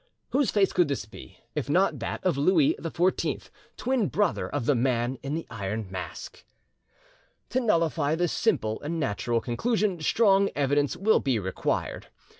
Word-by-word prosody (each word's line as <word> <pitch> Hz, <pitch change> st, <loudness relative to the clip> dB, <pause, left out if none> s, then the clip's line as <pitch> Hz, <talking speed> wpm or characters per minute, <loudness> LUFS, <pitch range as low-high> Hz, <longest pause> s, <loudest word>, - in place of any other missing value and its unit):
Whose 270 Hz, -5 st, +2 dB
face 200 Hz, -2 st, +2 dB
could 175 Hz, -, +3 dB
this 140 Hz, -8 st, -2 dB
be, 105 Hz, -, -13 dB, 0.2 s
if -, -, -3 dB
not -, -, +2 dB
that -, -, -5 dB
of 180 Hz, -5 st, +2 dB
Louis 150 Hz, +1 st, +4 dB
XVI, 175 Hz, +3 st, -1 dB, 0.3 s
twin 245 Hz, -5 st, +1 dB
brother 205 Hz, -3 st, 0 dB
of 145 Hz, -5 st, -2 dB
the 145 Hz, -, +4 dB
Man 125 Hz, 0 st, 0 dB
in 140 Hz, +2 st, -3 dB
the 165 Hz, -, -4 dB
Iron 105 Hz, -2 st, -4 dB
Mask? 90 Hz, -4 st, -7 dB, 1.1 s
To 255 Hz, -, +1 dB
nullify 165 Hz, -, +1 dB
this 175 Hz, 0 st, 0 dB
simple 110 Hz, 0 st, 0 dB
and 160 Hz, +3 st, -3 dB
natural 115 Hz, -2 st, -1 dB
conclusion 200 Hz, -, 0 dB
strong 200 Hz, +2 st, +4 dB
evidence 145 Hz, 0 st, +1 dB
will 215 Hz, +4 st, +3 dB
be 130 Hz, -4 st, 0 dB
required. 95 Hz, -3 st, -2 dB
150 Hz, 155 wpm, -27 LUFS, 120-195 Hz, 1.1 s, Louis